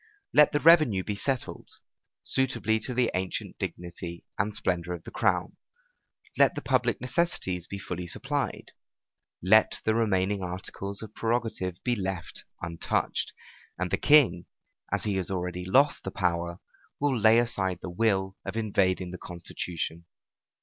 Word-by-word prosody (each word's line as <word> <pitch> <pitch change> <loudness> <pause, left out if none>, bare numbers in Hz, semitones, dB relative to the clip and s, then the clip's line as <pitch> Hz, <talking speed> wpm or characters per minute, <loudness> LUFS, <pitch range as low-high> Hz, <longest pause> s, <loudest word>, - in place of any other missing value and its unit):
Let 150 -1 +7
the 145 - +1
revenue 155 - +6
be 105 - -3
settled, 130 +4 -3 0.5
suitably 125 -4 +1
to 125 - -3
the 125 -1 +2
ancient 95 -1 -3
dignity 85 0 -6
and 100 +2 -1
splendor 90 -3 -1
of 85 -2 -7
the - - -9
crown; - - 0 0.8
let - - +5
the - - -3
public - - +1
necessities 125 - -1
be 100 - -5
fully 90 -2 -5
supplied; 85 - -3 0.7
let 110 +4 +5
the 110 - +2
remaining 100 -3 +1
articles 95 +3 -5
of 110 -1 -10
prerogative 115 -6 -1
be 125 -1 +1
left 95 -4 -4 0.2
untouched; 85 -1 -1 0.5
and 90 +1 -2
the - - +2
king, 125 - +5 0.4
as - - 0
he 100 -2 0
has 95 - -2
already 90 -1 -3
lost 135 +10 +3
the - - -3
power, 85 -1 -1 0.4
will 145 -2 +2
lay 110 0 +5
aside 100 -6 +1
the 90 - -4
will, 95 -1 +1
of - - -5
invading 95 -4 +1
the 90 - -7
constitution. 85 -1 -5
95 Hz, 145 wpm, -28 LUFS, 90-115 Hz, 0.8 s, Let